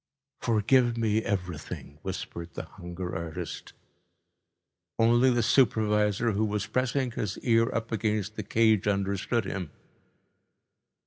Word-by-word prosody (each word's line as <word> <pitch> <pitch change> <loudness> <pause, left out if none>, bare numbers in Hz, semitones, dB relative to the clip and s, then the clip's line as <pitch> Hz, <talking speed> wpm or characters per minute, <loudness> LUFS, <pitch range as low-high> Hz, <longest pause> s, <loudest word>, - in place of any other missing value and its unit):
"Forgive 120 +2 +3
me 110 -1 +2
everything," 90 -6 -4
whispered 85 0 -6
the - - -4
hunger 90 +1 -7
artist. 80 -1 -6 1.2
Only 120 +3 +5
the 120 -2 +2
supervisor, 105 -2 +3
who 105 +1 0
was 105 -1 -1
pressing 130 0 0
his 105 -4 -3
ear 115 -1 +3
up 115 0 -3
against 105 -2 -1
the 105 - -3
cage, 110 -1 +2
understood 100 +3 0
him. 90 -5 -4
105 Hz, 115 wpm, -28 LUFS, 100-115 Hz, 1.2 s, Only